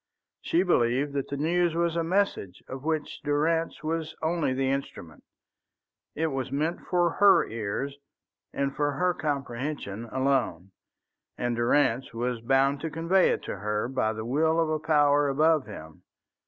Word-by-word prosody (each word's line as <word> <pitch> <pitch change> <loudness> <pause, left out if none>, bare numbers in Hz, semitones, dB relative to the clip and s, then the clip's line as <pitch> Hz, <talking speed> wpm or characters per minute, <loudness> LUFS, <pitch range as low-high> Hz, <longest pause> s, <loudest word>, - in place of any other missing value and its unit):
She 170 +3 +1
believed 140 -4 +1
that 140 -1 -2
the 140 - -4
news 170 +3 +1
was 170 -1 0
a 165 - 0
message 175 - -1
of 130 +1 -7
which 155 -1 -2
Durrance 160 +4 0
was 160 0 -3
only 160 -3 0
the 135 +1 0
instrument. 110 - -5 0.9
It 160 - 0
was 135 -2 -3
meant 155 +5 -1
for 175 -2 +2
her 205 +3 +5
ears, 115 +6 -4 0.5
and 140 0 -2
for 145 -1 0
her 180 +5 +1
comprehension 135 - -4
alone, 120 -8 -1 0.7
and 120 -1 -1
Durrance 120 0 +1
was 120 0 -2
bound 135 +3 +2
to 160 - -3
convey 165 +4 +2
it - - -1
to - - -5
her 105 +2 -2
by 125 -4 0
the 110 0 -6
will 160 +6 +2
of 165 -1 +1
a 155 - 0
power 145 -2 +3
above 155 0 +2
him. 80 -7 -10
145 Hz, 155 wpm, -27 LUFS, 125-160 Hz, 0.9 s, her